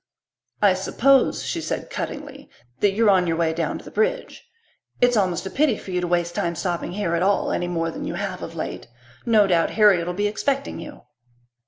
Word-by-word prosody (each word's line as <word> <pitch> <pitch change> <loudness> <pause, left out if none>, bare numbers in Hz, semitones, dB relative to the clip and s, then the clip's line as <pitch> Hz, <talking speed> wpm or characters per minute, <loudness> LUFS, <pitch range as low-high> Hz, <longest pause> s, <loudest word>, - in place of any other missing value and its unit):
"I 200 -2 +6
suppose," 260 +8 +2
she - - -2
said - - -4
cuttingly, 285 -1 -6 0.3
"that 200 -1 +3
you're 215 0 +4
on 185 -2 +3
your 165 -1 0
way 165 -1 +1
down 165 0 -2
to - - -13
the - - -10
bridge. - - -2 0.5
It's 245 0 +4
almost 185 -4 0
a 190 - -5
pity 280 -6 +2
for 190 - -9
you 180 0 0
to 175 - -2
waste 175 0 0
time 170 0 -1
stopping 175 0 -3
here 190 -4 -2
at 170 - +1
all, 200 +2 +1
any 175 - -1
more 165 -1 -1
than - - -6
you 170 - -4
have 190 -1 -4
of 165 - -7
late. 160 - -5 0.4
No 220 -3 +5
doubt 175 -4 +2
Harriet'll 180 -5 +4
be 205 +2 0
expecting 275 +7 -1
you." - - -10
190 Hz, 205 wpm, -23 LUFS, 175-220 Hz, 0.5 s, I